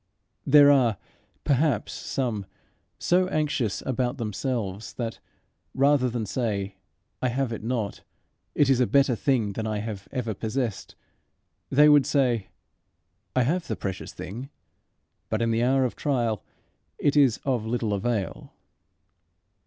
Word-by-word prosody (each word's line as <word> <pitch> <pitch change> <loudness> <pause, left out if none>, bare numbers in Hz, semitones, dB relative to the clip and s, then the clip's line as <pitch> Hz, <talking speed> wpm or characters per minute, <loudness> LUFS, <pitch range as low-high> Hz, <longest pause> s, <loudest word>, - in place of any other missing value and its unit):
There 145 0 +8
are, 120 -7 +3 0.5
perhaps, 140 -5 +1
some 115 -7 -3 0.5
so 180 +1 +2
anxious 145 - -1
about 130 0 -1
themselves 110 -3 -3
that, 115 -2 -4 0.6
rather 140 -1 +3
than 115 -2 -3
say, 100 -3 -2 0.5
"I 130 - +2
have 125 -1 -1
it 110 - -6
not: 115 -3 -2 0.5
it 145 - +4
is 135 -2 +3
a 125 - +3
better 140 -3 +3
thing 115 -5 +1
than 110 +2 -3
I 110 -1 -1
have 105 -2 -5
ever 125 -5 -2
possessed," 110 +1 -3 0.7
they 150 +2 +6
would 145 -3 +6
say, 125 -8 +1 0.9
"I 130 - +4
have 170 +7 0
the - - -2
precious 95 -1 -5
thing, 120 +9 -7 0.8
but 110 - 0
in 115 0 +1
the 115 +1 +1
hour 130 +2 +3
of 125 - -3
trial 120 -7 -1 0.5
it 145 - +1
is 135 -6 +4
of 125 -5 0
little 115 -2 -1
avail." 100 - -3
120 Hz, 135 wpm, -26 LUFS, 110-135 Hz, 0.9 s, There